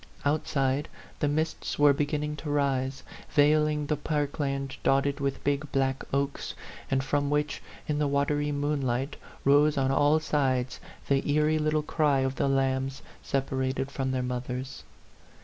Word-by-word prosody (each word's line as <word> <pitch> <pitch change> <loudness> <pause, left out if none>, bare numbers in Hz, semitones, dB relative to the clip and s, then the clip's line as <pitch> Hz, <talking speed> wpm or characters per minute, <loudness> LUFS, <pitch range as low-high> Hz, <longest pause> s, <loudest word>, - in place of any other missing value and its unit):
Outside, 145 -2 0 0.3
the 145 - +1
mists 155 +2 -1
were 145 -1 +6
beginning 150 +1 -1
to 150 - -6
rise, 135 -2 0 0.3
veiling 150 0 +4
the 150 - 0
park 145 0 -2
land 135 -2 -2
dotted 140 +1 +2
with 140 -1 -2
big, 145 +1 -1
black 135 0 0
oaks, 140 +1 -2 0.3
and 135 0 +1
from 145 +1 0
which, 150 0 0 0.3
in 150 -1 0
the 150 - +2
watery 145 +1 +1
moon 145 0 0
light, 130 +3 -1 0.3
rose 145 +2 +5
on 135 -1 +2
all 145 +3 +4
sides 130 -5 0 0.3
the 135 -1 +3
eerie 150 +1 +3
little 155 0 +1
cry 145 -3 +2
of 130 0 0
the - - +1
lambs 135 0 0 0.2
separated 135 0 -1
from 135 -1 -2
their 130 -1 -1
mothers. 125 +1 -4
140 Hz, 150 wpm, -28 LUFS, 135-150 Hz, 0.3 s, were